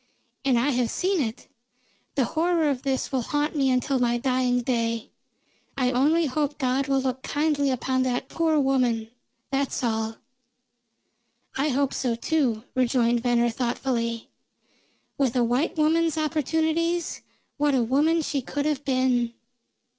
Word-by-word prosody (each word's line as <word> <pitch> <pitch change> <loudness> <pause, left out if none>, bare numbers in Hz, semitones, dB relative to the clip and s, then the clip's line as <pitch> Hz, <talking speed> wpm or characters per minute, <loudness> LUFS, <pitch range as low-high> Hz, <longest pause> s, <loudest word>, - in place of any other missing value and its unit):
"And 265 -3 +3
I 260 +5 +2
have 245 -3 0
seen 370 - 0
it! 225 -2 -4 0.7
The 270 -3 +2
horror 325 0 +1
of 255 -2 -3
this 270 -1 -1
will 265 -2 0
haunt 295 +5 -1
me 275 -2 +2
until 255 +1 +1
my 240 -1 +2
dying 250 0 +1
day. 230 -2 -1 0.7
I 255 -2 +2
only 300 +6 +3
hope 290 +1 -1
God 265 0 0
will 270 -1 +2
look 260 0 -2
kindly 290 -1 0
upon 260 0 0
that 255 0 -1
poor 320 0 +1
woman, 250 -5 +1 0.4
that's 275 -1 -1
all." 225 -1 -1 1.4
"I 280 +3 +1
hope 280 0 0
so, 245 -3 -1
too," 240 -4 0
rejoined 240 -2 +2
Venner 240 -1 +2
thoughtfully. 235 -1 -2 0.9
"With 265 -4 +1
a 245 - +3
white 250 +8 0
woman's 320 +1 +2
opportunities, 320 +2 0 0.4
what 290 -1 +2
a 250 - +3
woman 305 +7 +2
she 280 -2 -1
could 285 +3 -3
have 295 -2 -1
been." 255 -3 +1
265 Hz, 145 wpm, -25 LUFS, 245-295 Hz, 1.4 s, And